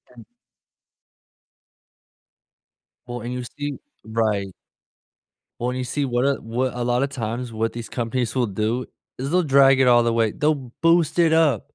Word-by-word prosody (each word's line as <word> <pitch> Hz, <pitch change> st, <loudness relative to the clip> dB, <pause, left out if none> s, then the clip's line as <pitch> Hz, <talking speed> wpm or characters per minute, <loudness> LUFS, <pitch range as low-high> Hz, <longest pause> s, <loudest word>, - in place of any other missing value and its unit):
And 115 Hz, -3 st, -13 dB, 2.8 s
Well, 120 Hz, -1 st, -6 dB
and 120 Hz, +2 st, -5 dB
you 125 Hz, 0 st, -4 dB
see 145 Hz, +2 st, -6 dB, 0.3 s
right. 110 Hz, -3 st, 0 dB, 1.1 s
When 125 Hz, +1 st, -2 dB
you 130 Hz, -, -2 dB
see 140 Hz, +3 st, -1 dB
what 120 Hz, 0 st, 0 dB
a 140 Hz, 0 st, +2 dB
what 125 Hz, +3 st, -2 dB
a 120 Hz, -, -2 dB
lotta 125 Hz, +3 st, +1 dB
times, 120 Hz, -2 st, -4 dB
what 115 Hz, +1 st, -2 dB
these 115 Hz, -1 st, -7 dB
companies 120 Hz, +1 st, -2 dB
will 125 Hz, -2 st, +2 dB
do 110 Hz, +5 st, -2 dB, 0.3 s
is 135 Hz, +4 st, -4 dB
they'll 180 Hz, 0 st, +4 dB
drag 135 Hz, -3 st, +5 dB
it 130 Hz, -, +4 dB
all 120 Hz, -1 st, +6 dB
the 115 Hz, -1 st, +1 dB
way, 115 Hz, -2 st, +2 dB
they'll 145 Hz, -5 st, -1 dB
boost 165 Hz, -1 st, +3 dB
it 165 Hz, -2 st, +4 dB
up. 150 Hz, -9 st, +3 dB
125 Hz, 160 wpm, -23 LUFS, 115-140 Hz, 2.8 s, all